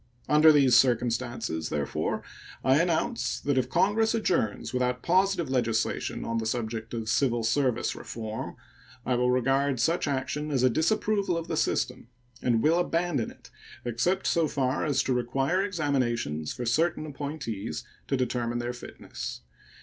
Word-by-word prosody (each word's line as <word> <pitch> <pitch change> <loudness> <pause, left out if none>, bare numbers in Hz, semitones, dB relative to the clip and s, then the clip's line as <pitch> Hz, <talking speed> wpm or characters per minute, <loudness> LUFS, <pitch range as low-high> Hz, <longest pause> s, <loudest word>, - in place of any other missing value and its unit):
Under 155 +1 +7
these 135 -5 +5
circumstances, 120 -7 +1
therefore, 75 -1 -2 0.4
I 135 +4 +4
announce 175 +8 0
that 145 -1 0
if 130 -1 +1
Congress 220 +3 +2
adjourns 170 - 0
without 125 0 0
positive 185 -1 +2
legislation 120 -4 -1
on 115 0 -1
the 110 - -2
subject 115 0 -3
of 115 -1 -4
"civil 120 -1 +1
service 120 +1 +1
reform" 110 -1 -6 0.5
I 130 - +1
will 125 0 +2
regard 135 +1 +2
such 165 +6 +1
action 145 +2 -2
as 135 -4 +1
a 130 - +5
disapproval 195 - +1
of 165 - -4
the - - -2
system, - - -1 0.3
and 115 -3 +2
will 165 +3 +4
abandon 170 -7 0
it, - - -16 0.3
except 125 +11 0
so 165 -2 +2
far 130 -3 0
as 145 -3 +1
to 130 - 0
require 135 +8 0
examinations 130 - -1
for 125 - -5
certain 155 +6 +1
appointees, 135 - -5 0.2
to 135 - 0
determine 120 -2 -1
their 120 0 -3
fitness. 120 - -7
130 Hz, 150 wpm, -28 LUFS, 120-155 Hz, 0.5 s, Under